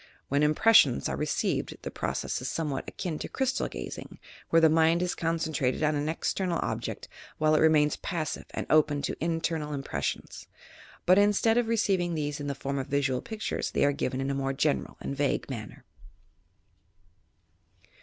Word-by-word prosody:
When 140 +1 +2
impressions 155 +10 +5
are - - -2
received, - - -1
the - - -5
process - - -3
is - - -3
somewhat 150 -4 -2
akin 170 -5 -4
to - - -5
crystal 265 -1 0
gazing, - - -7 0.3
where 165 - +5
the 165 - +6
mind 165 +2 +3
is 180 - -1
concentrated 160 -5 -1
on 155 0 +3
an 145 +1 -1
external 175 +2 -1
object - - -4 0.3
while 155 0 +3
it 155 - +4
remains 155 -2 +4
passive 165 -3 -3
and - - -4
open 150 -2 +3
to - - -3
internal 165 -3 -1
impres 135 - -4
sions; - - -4 0.6
but, 185 +2 +6
instead 210 +3 +4
of 240 - 0
receiving 195 -6 +1
these 145 -1 -2
in 145 - -4
the 140 - -2
form 140 +1 -3
of 130 - -4
visual 135 -2 0
pictures, 220 -1 -3
they - - +2
are 145 - +4
given 130 -2 -2
in 135 +1 -1
a - - -1
more 135 0 -1
general 145 +2 0
and 140 - -4
vague 140 0 0
manner. 110 -5 -8
155 Hz, 175 wpm, -28 LUFS, 140-170 Hz, 0.6 s, the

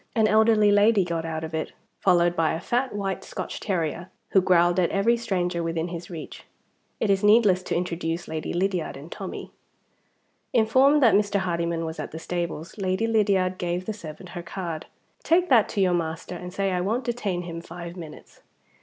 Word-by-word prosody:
An 220 -2 +4
elderly 215 -1 +4
lady 205 -1 +4
got 165 -1 -3
out 160 -1 -4
of 160 0 -6
it, 160 0 -3 0.3
followed 175 -2 +3
by 160 -1 +1
a - - -4
fat 245 +5 -1
white 195 -2 -3
Scotch - - -6
terrier, 175 -2 -2 0.2
who 190 - +4
growled 175 0 +3
at 175 - +2
every 210 +5 +2
stranger 180 -7 -1
within 165 0 -2
his 170 0 -7
reach. 165 -4 -8 0.6
It 215 - +2
is 195 0 +1
needless 205 -3 +5
to - - -3
introduce 170 -1 -2
Lady 160 -1 -4
Lydiard 180 -4 -1
and 145 +5 -11
Tommie. - - -7 1.0
Informed 260 +5 +4
that 230 - +6
Mr. 205 -1 +2
Hardyman 170 -2 -1
was 160 0 -6
at - - -4
the 160 - -8
stables, 170 +2 -4
Lady 190 +3 0
Lydiard 195 -5 +2
gave 175 +1 -2
the 220 - -3
servant 175 -2 -10
her 175 0 -6
card. 170 -2 -5 0.3
"Take 355 +2 +2
that 235 -6 +5
to 200 - -1
your 185 -2 +3
master, 165 +1 -3
and 180 0 -7
say 195 +1 -1
I 180 -1 0
won't 225 +8 -1
detain 210 -7 -2
him 170 -1 -6
five 170 0 -8
minutes." 160 -4 -11
180 Hz, 190 wpm, -25 LUFS, 170-205 Hz, 1.0 s, that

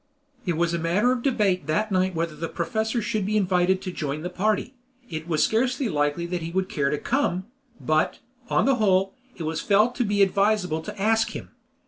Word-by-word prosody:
It 170 -3 0
was 170 0 +1
a 170 - 0
matter 185 +9 +2
of 255 -1 -1
debate 205 - +1
that 210 +8 0
night 185 -1 +1
whether 165 -1 -2
the 165 +2 -4
professor 220 +7 -1
should 215 -1 -1
be 210 +3 0
invited 185 -1 +2
to 185 - -4
join 150 -2 -4
the 180 - -4
party; 215 +6 0 0.4
it 155 0 -5
was 155 -3 +2
scarcely 250 +3 +1
likely 145 +1 0
that 175 0 -3
he 165 - -4
would 185 +2 -1
care 140 -2 0
to 150 - 0
come, 190 - 0 0.3
but, 155 0 +1 0.3
on - - +2
the 270 -1 +3
whole, 195 -3 +2 0.2
it 170 - -5
was 160 +1 -2
felt 215 +4 +3
to 250 - +2
be 205 -2 +3
advisable 195 -4 +1
to 210 +5 -8
ask 225 +2 +2
him. - - -7
185 Hz, 205 wpm, -25 LUFS, 165-215 Hz, 0.4 s, the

